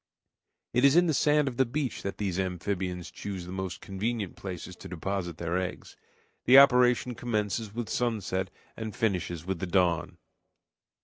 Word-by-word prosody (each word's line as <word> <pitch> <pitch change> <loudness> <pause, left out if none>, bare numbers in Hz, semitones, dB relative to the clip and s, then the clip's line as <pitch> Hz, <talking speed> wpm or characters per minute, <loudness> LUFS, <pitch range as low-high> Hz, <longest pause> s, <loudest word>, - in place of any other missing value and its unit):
It 125 +2 +2
is 140 +1 +6
in 175 +1 +6
the 160 - +2
sand 150 +1 +3
of 125 -3 -3
the 135 - +5
beach 130 0 -3
that 100 - -4
these 95 -3 -2
amphibians 90 -1 -3
choose 95 -3 -6
the 90 - -8
most 95 -1 -4
convenient 100 0 -3
places 90 -1 -7
to - - -10
deposit 90 -1 -3
their 85 +1 -1
eggs. 90 -1 -5 0.5
The 130 - +8
operation 125 -2 +6
commences 110 -2 -2
with 120 -2 -3
sunset 105 -6 -1 0.3
and 110 -2 -6
finishes 90 -6 -1
with 95 -2 -2
the 95 - -3
dawn. 85 -2 +1
100 Hz, 165 wpm, -29 LUFS, 90-120 Hz, 0.5 s, The